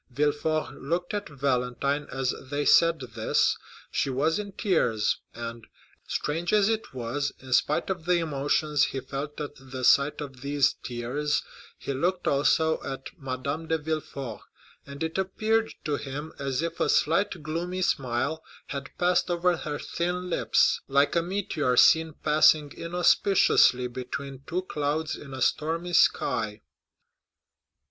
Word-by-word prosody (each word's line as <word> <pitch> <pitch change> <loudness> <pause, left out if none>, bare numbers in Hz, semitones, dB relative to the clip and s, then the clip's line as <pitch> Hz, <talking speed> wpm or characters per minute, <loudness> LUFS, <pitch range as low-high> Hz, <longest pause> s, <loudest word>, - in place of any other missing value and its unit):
Villefort 150 +3 -1
looked 175 +7 -2
at 205 -3 -3
Valentine 140 +1 -1
as 135 -1 -1 0.2
they 145 +1 -1
said 165 -2 +5
this. 115 -3 +1 0.4
She - - 0
was 155 +7 +1
in 200 -1 -6
tears, 160 - +1 0.2
and, 115 -1 -7 0.4
strange 165 +4 -2
as 210 -1 +4
it 225 0 -2
was, 130 +3 -2
in 130 -1 -6
spite 150 +8 +2
of 170 -4 -4
the 180 0 +3
emotions 150 -1 +1
he 135 - -3
felt 140 +3 -6
at 145 -1 -5
the 130 -1 -8
sight 140 +3 +4
of 135 -4 -7
these 140 0 +2
tears, 130 +5 -2 0.3
he 140 - -4
looked 180 +7 -1
also 160 +3 +2
at 135 0 -6
Madame 140 +4 -4
de 160 - +1
Villefort, 150 -6 -4 0.5
and 140 +2 -6
it 160 +3 -2
appeared 220 +4 0
to 150 -2 0
him 145 +3 -6
as 140 +1 -1
if 170 0 -4
a - - +1
slight 170 +1 +2
gloomy 175 +4 -2
smile 135 +3 -1 0.3
had 140 -1 -5
passed 180 0 +2
over 175 0 +2
her 150 -3 -4
thin 180 +3 -3
lips, - - +2
like 140 +3 +3
a 170 - +4
meteor 170 -8 -1
seen 160 +3 +6
passing 150 -1 +4
inauspiciously 175 -6 +3
between 130 +2 -6
two 180 +2 -2
clouds 150 -2 -2
in 140 - -11
a 130 -2 -2
stormy 165 +3 0
sky. 105 -9 +2
150 Hz, 145 wpm, -27 LUFS, 135-170 Hz, 0.5 s, seen